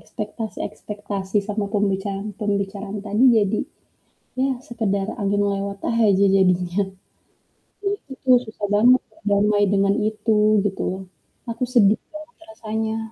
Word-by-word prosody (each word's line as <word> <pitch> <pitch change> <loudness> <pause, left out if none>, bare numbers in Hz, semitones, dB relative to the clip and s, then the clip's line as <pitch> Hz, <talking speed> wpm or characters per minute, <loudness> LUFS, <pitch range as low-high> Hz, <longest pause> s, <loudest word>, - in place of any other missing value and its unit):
Ekspektasi-ekspektasi 210 -2 -4
sama 210 0 -1
pembicaraan-pembicaraan 200 0 -2
tadi 210 +5 +2
jadi 210 0 +2 0.8
ya 270 +1 +2 0.2
sekedar 200 -4 -1
angin 200 0 +1
lewat 200 0 -4
aja 205 -4 +4
jadinya. 180 +1 +2 1.0
Nah 395 - +2
itu 290 - -22
tuh 255 -1 +7
susah 220 -2 -5
banget 245 +4 +5
berdamai 205 0 +1
dengan 195 0 +3 0.2
itu, 215 0 0 0.3
gitu 195 -1 -2
loh. 190 +1 -6 0.5
Aku 230 +2 -4
sedih 215 -4 +5
banget 310 +1 -11
rasanya. 220 -6 -3
205 Hz, 115 wpm, -22 LUFS, 200-220 Hz, 1.0 s, tuh